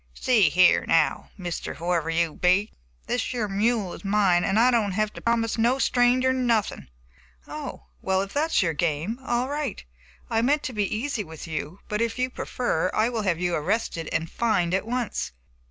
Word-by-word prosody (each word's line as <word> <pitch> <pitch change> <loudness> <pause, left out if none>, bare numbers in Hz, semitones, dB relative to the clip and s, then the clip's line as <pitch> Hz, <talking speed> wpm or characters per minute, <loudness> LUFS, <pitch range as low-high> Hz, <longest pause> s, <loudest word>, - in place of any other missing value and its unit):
"See 215 - +3
here, 180 +4 +5
now, 165 -2 +2
Mr. 175 -3 -5
Whoever 170 -1 -1
you 165 -1 +1
be, 185 +4 +2 0.3
this 245 - -1
yer 230 -4 -1
mule 205 -1 0
is - - -10
mine, 195 -3 +3
and 195 +3 +2
I 250 +2 +5
don't 215 -5 +1
have 215 +1 0
to - - -9
promise 230 -1 0
no 240 +4 +3
stranger 255 0 +3
nothin'." 230 - 0 0.6
"Oh, - - -7 0.2
well, 190 0 +1
if 195 - -9
that 305 +3 +1
is 225 - +3
your 165 -2 0
game, 165 - -1
all 240 0 0
right. 285 - -4 0.4
I 225 - +1
meant 290 +5 +2
to 255 - -4
be 205 -3 -1
easy 230 0 -2
with 160 -3 -10
you, 160 +2 -5
but, 210 +1 -2
if 230 0 -1
you 255 0 -1
prefer, 185 -11 -1
I 220 +2 +3
will 235 -3 -2
have 185 -5 0
you 180 -1 0
arrested 165 0 -1
and 165 - -1
fined 180 -5 0
at 190 +3 0
once." 240 - -2
210 Hz, 190 wpm, -25 LUFS, 175-240 Hz, 0.6 s, here